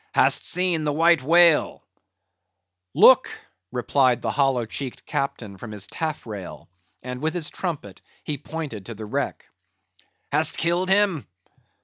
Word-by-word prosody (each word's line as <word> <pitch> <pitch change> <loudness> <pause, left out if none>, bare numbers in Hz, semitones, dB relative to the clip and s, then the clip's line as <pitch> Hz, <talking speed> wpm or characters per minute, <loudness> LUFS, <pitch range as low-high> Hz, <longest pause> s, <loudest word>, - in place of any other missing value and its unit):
"Hast - - +4
seen 180 -3 +1
the 150 - 0
White 165 +1 +3
Whale?" 165 +2 +4 1.1
"Look!" - - +6 0.4
replied 125 0 +1
the - - 0
hollow 135 -4 +1
cheeked 130 +3 -6
captain 120 -9 -4
from 120 - -8
his 105 -2 -3
taffrail; 115 - -6 0.4
and 125 +1 -6
with 160 +2 -1
his 165 -4 -2
trumpet 150 - -5 0.2
he 145 -3 -4
pointed 145 -10 -7
to 115 - -7
the 110 +1 -8
wreck. 105 - -3 0.9
"Hast 155 +1 +2
killed 175 +2 0
him?" 195 -6 +2
145 Hz, 130 wpm, -23 LUFS, 120-165 Hz, 1.1 s, Look